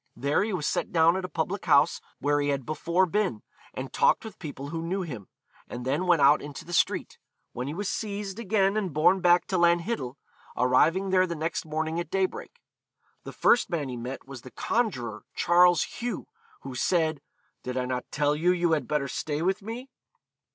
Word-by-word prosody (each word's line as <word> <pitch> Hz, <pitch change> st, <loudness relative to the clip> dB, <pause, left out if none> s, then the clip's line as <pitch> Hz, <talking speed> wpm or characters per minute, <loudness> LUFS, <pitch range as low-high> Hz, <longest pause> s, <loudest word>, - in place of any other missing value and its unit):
There 140 Hz, +5 st, +1 dB
he 215 Hz, +2 st, -1 dB
was 175 Hz, -6 st, -2 dB
set -, -, -1 dB
down 165 Hz, +1 st, +4 dB
at 190 Hz, -1 st, -2 dB
a -, -, -6 dB
public 175 Hz, +5 st, -3 dB
house 140 Hz, -, +4 dB, 0.2 s
where 145 Hz, 0 st, +1 dB
he 145 Hz, -, 0 dB
had 140 Hz, -3 st, -1 dB
before 170 Hz, +4 st, +1 dB
been, 185 Hz, -, -1 dB, 0.3 s
and -, -, -7 dB
talked -, -, +3 dB
with 220 Hz, -, -9 dB
people 140 Hz, -3 st, -7 dB
who 165 Hz, +1 st, -4 dB
knew 185 Hz, +3 st, -2 dB
him. 125 Hz, -, -7 dB, 0.4 s
He -, -, -6 dB
then 135 Hz, +8 st, -1 dB
went 170 Hz, -5 st, +4 dB
out 145 Hz, +2 st, +6 dB
into 145 Hz, -1 st, -8 dB
the 175 Hz, -, -8 dB
street, -, -, 0 dB, 0.3 s
when 125 Hz, +2 st, -4 dB
he 145 Hz, -, -4 dB
was 205 Hz, +2 st, -3 dB
seized 205 Hz, -1 st, -4 dB
again 200 Hz, -2 st, +1 dB
and 190 Hz, -8 st, -2 dB
borne 165 Hz, +5 st, +4 dB
back 175 Hz, 0 st, +4 dB
to 185 Hz, -, -1 dB
Lanhiddel, 170 Hz, -, +1 dB, 0.4 s
arriving 165 Hz, +10 st, +3 dB
there 185 Hz, 0 st, +4 dB
the 170 Hz, -, -4 dB
next 160 Hz, +1 st, -3 dB
morning 160 Hz, +2 st, -2 dB
at 170 Hz, -, -4 dB
daybreak. 195 Hz, -, -3 dB, 0.6 s
The -, -, -6 dB
first 240 Hz, -, +3 dB
man 155 Hz, -6 st, -2 dB
he 125 Hz, -, -4 dB
met 125 Hz, +3 st, -6 dB
was 135 Hz, -3 st, -9 dB
the 130 Hz, -, -11 dB
conjuror 125 Hz, -, -2 dB
Charles 175 Hz, -1 st, +5 dB
Hugh, 245 Hz, 0 st, -5 dB, 0.4 s
who 135 Hz, -, -7 dB
said, 155 Hz, +2 st, +1 dB, 0.4 s
'Did 125 Hz, 0 st, -4 dB
I 125 Hz, -, 0 dB
not 125 Hz, 0 st, -3 dB
tell 145 Hz, 0 st, +1 dB
you 170 Hz, +4 st, +2 dB
you 175 Hz, -2 st, +1 dB
had 150 Hz, -6 st, +1 dB
better 150 Hz, -2 st, 0 dB
stay 150 Hz, +3 st, -3 dB
with 190 Hz, +3 st, 0 dB
me?' 235 Hz, +6 st, -7 dB
165 Hz, 200 wpm, -27 LUFS, 140-190 Hz, 0.6 s, out